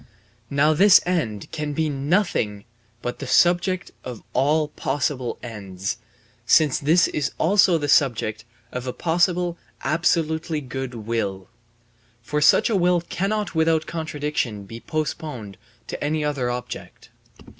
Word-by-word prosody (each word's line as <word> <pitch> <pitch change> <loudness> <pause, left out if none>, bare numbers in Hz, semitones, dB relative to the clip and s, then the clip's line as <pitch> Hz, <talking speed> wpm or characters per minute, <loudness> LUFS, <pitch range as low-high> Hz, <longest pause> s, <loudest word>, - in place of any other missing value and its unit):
Now 145 +3 +3
this 195 +5 +7
end 140 - -2
can 150 -1 -3
be 160 +2 0
nothing 140 - 0 0.4
but 120 - -4
the 140 - -5
subject 180 +5 +3
of 125 -4 -7
all 150 +3 +2
possible 135 -3 -2
ends, 100 -5 -5 0.5
since 150 -4 +4
this 165 +5 +4
is 150 -3 -2
also 185 0 +4
the 145 -2 -2
subject 110 -6 +2 0.3
of 125 0 -5
a 125 - -2
possible 175 +1 +1 0.2
absolutely 160 +2 +1
good 130 -2 -5
will; 105 -4 -3 0.7
for 150 +5 -1
such 150 - +5
a 225 - +1
will 180 -2 +3
cannot 205 +2 -1
without 160 -1 +2
contradiction 150 -9 -3
be 115 +4 -9
postponed 145 - -4 0.3
to - - -5
any 150 +1 0
other 140 -4 -1
object. 120 0 -7
150 Hz, 130 wpm, -23 LUFS, 120-165 Hz, 0.7 s, this